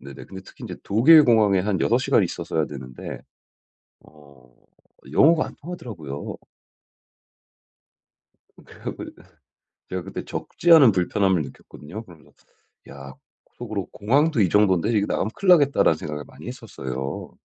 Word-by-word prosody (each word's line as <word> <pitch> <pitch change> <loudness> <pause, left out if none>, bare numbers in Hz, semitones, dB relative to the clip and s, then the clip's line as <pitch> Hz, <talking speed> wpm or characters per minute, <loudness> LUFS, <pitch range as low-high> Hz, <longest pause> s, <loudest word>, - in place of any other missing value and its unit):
네네. 70 0 -11
근데 95 -1 -10
특히 - - -16
인제 - - -7
독일 145 +9 +6
공항에 105 -5 +4
한 95 -1 -1
6 - - +2
시간 - - +2
있었어야 80 -1 -2
되는데 65 -3 -8 0.8
어 70 -5 -20 0.6
영어가 155 - +4
안 - - -12
통하더라고요. 105 - -7 2.3
그래 - - -17
갖고 - - -5 0.8
제가 90 -1 -4
그때 95 - -7
적지 175 - 0
않은 140 -9 +8
불편함을 95 -1 +1
느꼈거든요. 85 +8 -11
그러면서 85 - -18 0.6
야 70 -1 -11 0.4
속으로 - - -5
'공항도 130 +6 +1
이 95 - +4
정돈데 105 +1 +2
이거 105 -2 +1
나가면 110 - -1
큰일 195 - +1
나겠다.'라는 140 - +4
생각을 75 -2 -6
많이 - - -14
했었어요. 70 - -7
95 Hz, 310 characters per minute, -23 LUFS, 75-120 Hz, 2.3 s, 않은